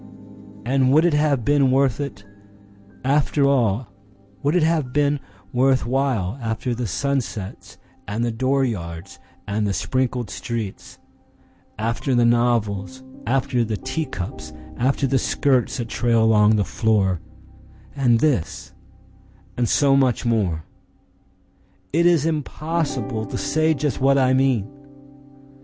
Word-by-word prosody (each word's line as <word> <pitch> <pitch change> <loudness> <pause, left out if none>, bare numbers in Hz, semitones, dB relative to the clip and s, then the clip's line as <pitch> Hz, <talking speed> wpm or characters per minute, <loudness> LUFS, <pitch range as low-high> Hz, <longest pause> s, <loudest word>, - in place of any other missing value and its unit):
And 130 +1 +2
would 155 +4 +5
it 175 - +3
have 145 -5 +1
been 145 -1 +3
worth 135 -1 +2
it, 140 -8 -6 0.8
after 140 +1 +2
all, 115 -5 +1 0.5
Would 145 +4 +1
it 175 - +3
have 155 -5 +1
been 145 +1 +1 0.3
worth 130 +1 +2
while, 130 -4 -1
After 115 +2 -2
the 120 0 -3
sunsets 115 -1 -3 0.3
and 110 +4 -1
the 120 - -1
dooryards 110 -9 -2 0.3
and 105 +1 -1
the 100 - -1
sprinkled 125 +4 -1
streets, 115 -5 -5 0.8
After 115 +4 -1
the 120 -1 +4
novels, 120 -1 0 0.2
after 125 -1 +1
the 110 -2 -3
teacups, 90 - -5 0.2
after 135 - +1
the 135 0 +2
skirts 130 -2 +1
that 120 -2 -3
trail 115 -1 +2
along 110 -1 +4
the 105 - +2
floor—And 110 - -1
this, 135 - -1 0.8
and 120 -2 0
so 140 -2 +4
much 130 -3 +2
more?—It 110 - -4
is 165 -4 +3
impossible 155 -6 -2
to - - -5
say 155 +1 +1
just 145 -1 -2
what 135 +1 +4
I 130 -1 +3
mean! 130 -6 +2
125 Hz, 120 wpm, -22 LUFS, 110-140 Hz, 0.8 s, would